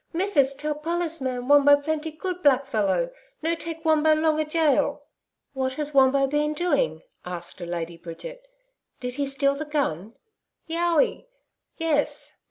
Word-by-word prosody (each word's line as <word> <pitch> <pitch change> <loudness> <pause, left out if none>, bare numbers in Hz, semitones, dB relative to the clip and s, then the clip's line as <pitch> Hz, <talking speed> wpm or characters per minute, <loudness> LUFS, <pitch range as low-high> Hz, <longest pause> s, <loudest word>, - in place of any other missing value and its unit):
Mithis 325 -7 +2
tell 300 +2 -2
pollis 330 +1 -1
man 250 -1 -3
Wombo 285 0 +7
plenty 315 +2 -2
good 360 +3 -5
blackfellow. 270 - +2 0.3
No 330 +1 +1
take 330 0 -6
Wombo 315 0 +4
long 310 0 +1
a 310 - +1
gaol.' 305 -2 +1 0.5
'What 260 -1 -1
has 295 +1 -3
Wombo 275 0 +4
been 295 +2 0
doing?' 360 +12 0 0.2
asked 175 0 -5
Lady 170 -1 -4
Bridget. 175 - -9 0.6
'Did 250 0 -3
he 280 +2 -1
steal 275 0 +1
the 285 +2 -4
gun?' 240 - -2 0.5
'YOWI 335 - +1 0.5
(yes). 315 -3 0
295 Hz, 140 wpm, -25 LUFS, 265-325 Hz, 0.6 s, Wombo